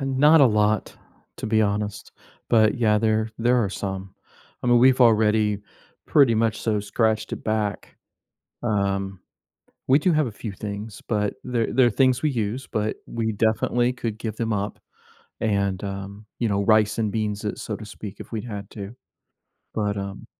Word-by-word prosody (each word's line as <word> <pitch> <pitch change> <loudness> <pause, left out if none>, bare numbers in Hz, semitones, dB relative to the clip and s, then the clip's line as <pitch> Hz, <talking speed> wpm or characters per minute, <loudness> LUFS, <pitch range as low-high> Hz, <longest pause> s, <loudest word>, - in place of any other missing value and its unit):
not 140 +4 +5
a 135 - +8
lot, 105 -1 +1 0.4
to - - -4
be 110 0 +2
honest. 105 0 -2 0.4
But, 110 +1 +4
yeah, 105 -2 +3
there 110 0 +1
there 120 +1 +3
are 100 - 0
some. 95 -1 -5 0.5
I - - -3
mean, 120 0 +5
we've 130 +1 +5
already 110 -3 +4 0.5
pretty 135 -6 +5
much 110 0 +1
so 105 -2 0
scratched 110 +2 0
it - - -5
back. 110 -2 -2 0.7
Um, 100 -3 -1 0.7
we 135 +3 +5
do 180 +4 +2
have 155 -4 +2
a - - -5
few 105 0 -6
things, 105 +1 -6
but 105 -2 0
they're 120 -4 -1
they're 125 -1 +5
things 130 +2 +3
we 155 - +2
use, 115 +2 -3
but 110 0 -1
we 110 -1 -2
definitely 115 +3 +1
could 115 -3 -4
give 110 -2 -4
them 115 -1 -1
up 100 0 -3 0.6
and, 100 -3 0
um, 100 +2 -6
you 115 - 0
know, 100 0 +1
rice 110 0 +3
and 110 -2 0
beans 105 -2 -2
it, 105 - -3
so 105 - -4
to 110 - -9
speak, 105 -1 -9
if - - -10
we'd 110 0 -3
had 105 -4 -7
to. 100 +1 -8 0.8
But, 105 -2 -1
um 100 0 -6
110 Hz, 175 wpm, -24 LUFS, 105-115 Hz, 0.8 s, a